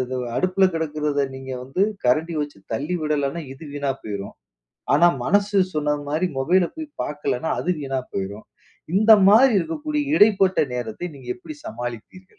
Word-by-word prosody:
ஆ - - -2 0.2
அடுப்பில 185 +1 +3
கிடக்கிறதை 150 -3 -1
நீங்க 130 0 -8
வந்து 135 +9 -2 0.2
கரண்டி 160 +7 +2
வச்சு 145 -7 -4 0.2
தள்ளி 150 +10 -2
விடலனா 150 +1 -1
இது 135 - -13
வீணா 140 -1 -1
போய்ரும், 100 -2 -6 0.6
ஆனா 175 - +6 0.2
மனசு 205 +1 +2 0.2
சொன்ன 150 -1 +1
மாரி 160 +5 +1
மொபைல 175 +6 +3
போய் 315 -1 -6 0.2
பார்க்கலனா 145 0 -2
அது 180 - -3
வீணா 135 -2 -2
போய்ரும், 100 +2 -4 0.5
இந்த 215 +2 +5 0.2
மாதிரி 245 +5 +7
இருக்கக்கூடிய 300 - -2
இடைப்பட்ட 195 -3 +4 0.2
நேரத்தை 120 +7 -4
நீங்க 125 -2 -14
எப்டி 295 +12 -10
சமாளிப்பீர்கள்? 120 - -7
155 Hz, 145 wpm, -23 LUFS, 135-190 Hz, 0.6 s, மாதிரி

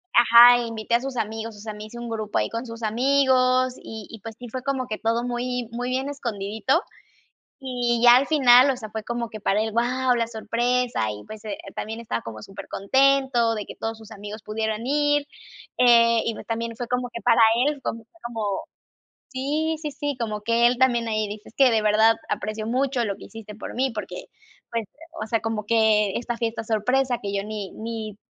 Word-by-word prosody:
Ajá, 240 +1 +8
invité 230 0 -4
a 235 - +2
sus 265 -1 -5
amigos, 220 0 -4
o - - -13
sea, 215 +1 -6
me 210 0 -8
hice 215 +2 -11
un 240 - -6
grupo 215 -2 -3
ahí - - +1
con 230 +2 -4
sus 230 0 -9
amigos 255 +2 +3
y 220 -2 -8
y, 225 - -9
pues, 225 +1 -8
sí 245 - -8
fue 255 +3 -5
como 265 -2 -2
que 215 - -3
todo 230 +1 0
muy 245 -1 -3
muy 245 +2 -3
bien 260 +2 -1
escondidito. 225 - -1 0.8
Y 245 -3 -1
ya 240 0 +9
al 270 +2 +1
final, 260 -3 +6
o 265 - 0
sea, 220 -3 -8
fue 220 0 -5
como 235 0 -3
que 215 - -7
para 205 +1 +1
él, 220 - -3
guau, 250 +3 +1
la 230 -1 0
sorpresa 235 - -1
y, 105 0 -8
pues, 215 -1 -10
eh, 210 -2 -5 0.2
también 220 +1 -5
estaba 215 - -3
como 110 -1 -8
super 195 - -10
contento 265 +1 +2
de 210 -2 -4
que - - -10
todos 225 0 -4
sus 220 0 -14
amigos 210 +1 -8
pudieran 220 +1 -3
ir, 290 +1 +2 0.5
eh, 235 -2 +6
y 230 - -1
pues - - -9
también 230 0 -3
fue 245 - -4
como 250 0 -1
que 235 - -7
para 240 -1 +4 0.2
él, 290 -1 -1
también 230 0 -5
fue 335 - -25
como 220 -5 -3 0.6
Sí, 295 +4 -1
sí, 300 - -3
sí, 285 0 -4
como 215 -3 -3
que 235 +2 +3
él 245 0 -1
también 240 -3 +2
ahí 215 -1 0
dice: 210 +1 -9
"Es - - -30
que 270 -2 +6
de 220 -1 +2
verdad 215 +2 +5 0.2
aprecio 215 +1 -3
mucho 255 0 0
lo 200 -3 -3
que - - -12
hiciste 215 -2 -10
por - - -8
mí, 260 +2 +1
porque 225 - -6 0.4
pues, 230 -2 -2 0.4
o - - -3
sea, 225 0 0
como 220 -1 -3
que 215 -2 +3
esta 240 0 -3
fiesta 230 -1 -2
sorpresa 245 +4 +1
que 200 0 -4
yo 200 - 0
ni 210 -2 -5
ni 220 -2 -6
230 Hz, 215 wpm, -24 LUFS, 220-250 Hz, 0.8 s, ya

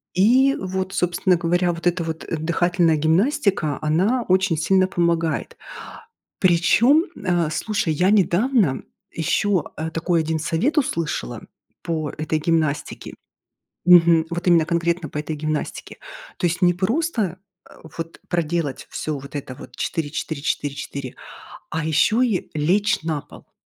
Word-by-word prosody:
И 255 +8 +4
вот, 190 0 -4
собственно 180 0 +1
говоря, 175 +1 +1
вот 170 +1 -3
эта 175 -1 +1
вот, 160 0 -5
э, - - -2
дыхательная 170 0 +1
гимнастика, 175 - +1
она 190 +11 +1
очень 185 -3 +2
сильно 185 +4 +3
помогает. 170 -3 -1 0.8
Причём, 205 - +4 0.2
а, 175 -3 +1
слушай, 200 -1 -1
я 180 +5 +2
недавно 205 - +2 0.3
ещё, 180 +3 0
э, 160 +1 -3
такой 165 0 0
1 160 0 -2
совет 170 - -1
услышала 165 - -2 0.4
по 155 -3 -2
этой 155 0 -2
гимнастике. 155 -3 -1 0.7
Мгм. 170 -2 +6
Вот 175 +2 -4
именно 165 -3 +5
конкретно 170 -2 -1
по - - -6
этой 155 +1 -4
гимнастике. 155 0 -4 0.4
То 175 - +1
есть 175 +3 -3
не 175 0 +4
просто, 215 - -1 0.3
э, - - -15 0.2
вот 165 0 -6
проделать 165 -5 -2
всё 150 -3 -3
вот 140 +2 -11
это 135 -2 -5
вот - - -12
4-4-4-4, 145 -3 -4 0.6
а 160 -1 -2
ещё 215 - +2
и 225 -8 0
лечь 185 +8 +1
на 155 -3 -2
пол. - - -17
170 Hz, 135 wpm, -22 LUFS, 155-185 Hz, 0.8 s, Мгм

